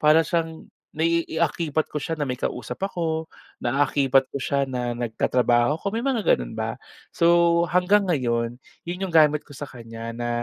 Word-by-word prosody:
para 155 +2 +5
siyang 165 -1 -3 0.2
naiaakibat 165 -1 0
ko 150 - -5
siya 165 -1 -3
na 145 - -1
may 130 - -1
kausap 125 -1 -4
ako, 165 -4 -2 0.3
naaakibat 135 +1 +2
ko 140 - -6
siya 140 0 0
na 125 -2 -3
nagtatrabaho 120 +3 +1
ako, 200 +5 -3
may 230 - -1
mga 255 -5 +2
gano'n - - -6
ba? - - -2 0.4
So, 170 0 +4
hanggang 185 +2 +3
ngayon 120 -4 0 0.2
'yon 175 +1 -5
'yong 190 -3 -4
gamit 150 -2 +4
ko 145 - -13
sa 145 0 -7
kanya 115 -1 -8
na 120 +1 -4
150 Hz, 165 wpm, -24 LUFS, 125-170 Hz, 0.4 s, para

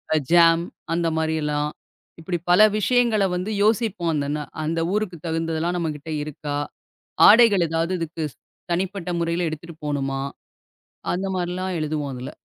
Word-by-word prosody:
அ - - +4
jam 170 -1 +6 0.3
அந்த 170 0 +1
மாரி 160 0 0
எல்லாம். 150 0 0 0.5
இப்படி 175 +2 -2
பல 180 - +6 0.2
விஷயங்கள 235 -1 +2
வந்து 180 +4 -3
யோசிப்போம். 215 -5 +1
அந்த 145 -1 -1
ந - - -3 0.2
அந்த 165 +2 -1
ஊருக்குத் 185 -6 -3
தகுந்ததெல்லாம் 165 +1 -1
நம்மகிட்ட 160 -2 -4
இருக்கா? 145 -1 -5 0.7
ஆடைகள் 210 -5 +6
எதாவது 165 +2 -1
இதுக்கு 165 0 -4
ஸ் - - -32 0.3
தனிப்பட்ட 185 0 -2
முறையில 170 +1 0
எடுத்துட்டு 160 +1 -8
போகணுமா? 135 -2 -2 0.9
அந்த 185 +2 -2
மாரில்லாம் 180 +1 -2
எழுதுவோம் 150 -2 -2
அதுல. 125 +1 -6
170 Hz, 140 wpm, -23 LUFS, 155-185 Hz, 0.9 s, jam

